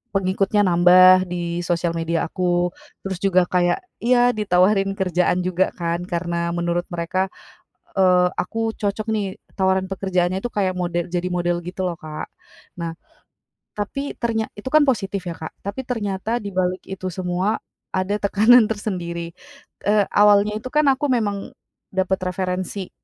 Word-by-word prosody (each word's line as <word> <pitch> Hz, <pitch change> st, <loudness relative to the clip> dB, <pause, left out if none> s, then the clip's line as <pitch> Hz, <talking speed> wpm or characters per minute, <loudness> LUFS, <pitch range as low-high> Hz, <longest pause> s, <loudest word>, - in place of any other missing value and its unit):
pengikutnya 195 Hz, +2 st, +2 dB
nambah 185 Hz, +1 st, +6 dB
di 175 Hz, -1 st, -3 dB
sosial 170 Hz, -1 st, 0 dB
media 165 Hz, 0 st, -1 dB
aku, 175 Hz, 0 st, 0 dB, 0.3 s
terus 190 Hz, -2 st, -4 dB
juga 185 Hz, -2 st, +3 dB
kayak 175 Hz, -, +1 dB, 0.2 s
iya 245 Hz, +1 st, +4 dB
ditawarin 195 Hz, -2 st, +2 dB
kerjaan 180 Hz, -2 st, +1 dB
juga 185 Hz, +1 st, +1 dB
kan, 170 Hz, 0 st, -2 dB
karena 170 Hz, -1 st, -2 dB
menurut 175 Hz, 0 st, -1 dB
mereka, 185 Hz, +3 st, -1 dB, 0.7 s
eee, 180 Hz, -1 st, +5 dB
aku 225 Hz, +3 st, -1 dB
cocok 210 Hz, +1 st, -2 dB
nih 200 Hz, -3 st, -2 dB, 0.2 s
tawaran 190 Hz, 0 st, +2 dB
pekerjaannya 185 Hz, -1 st, 0 dB
itu 245 Hz, -, -3 dB
kayak 190 Hz, -3 st, +1 dB
mode 175 Hz, 0 st, -2 dB
jadi 180 Hz, 0 st, -1 dB
model 175 Hz, -1 st, 0 dB
gitu 180 Hz, +2 st, -5 dB
loh 175 Hz, -, -3 dB
Kak, 155 Hz, -2 st, -6 dB, 0.5 s
nah, 165 Hz, -1 st, -3 dB, 0.8 s
tapi 275 Hz, +7 st, -3 dB
ternya 225 Hz, -2 st, -1 dB
itu 210 Hz, -, -5 dB
kan 310 Hz, -, +7 dB
positif 200 Hz, -7 st, 0 dB
ya 170 Hz, -, -5 dB
Kak, 160 Hz, -, -7 dB
tapi 200 Hz, +6 st, -3 dB
ternyata 220 Hz, -2 st, -2 dB
dibalik 185 Hz, -2 st, -1 dB
itu 190 Hz, -1 st, -5 dB
semua, 185 Hz, +4 st, -1 dB, 0.4 s
ada 185 Hz, +2 st, 0 dB
tekanan 220 Hz, +4 st, +6 dB
tersendiri, 170 Hz, -6 st, -4 dB, 0.5 s
eee, 205 Hz, 0 st, +3 dB
awalnya 205 Hz, 0 st, +5 dB
itu 255 Hz, -, -7 dB
kan 300 Hz, 0 st, +3 dB
aku 270 Hz, +2 st, -1 dB
memang, 205 Hz, -5 st, -1 dB, 0.4 s
dapat 190 Hz, 0 st, 0 dB
referensi, 185 Hz, +1 st, -3 dB
185 Hz, 145 wpm, -22 LUFS, 175-205 Hz, 0.8 s, kan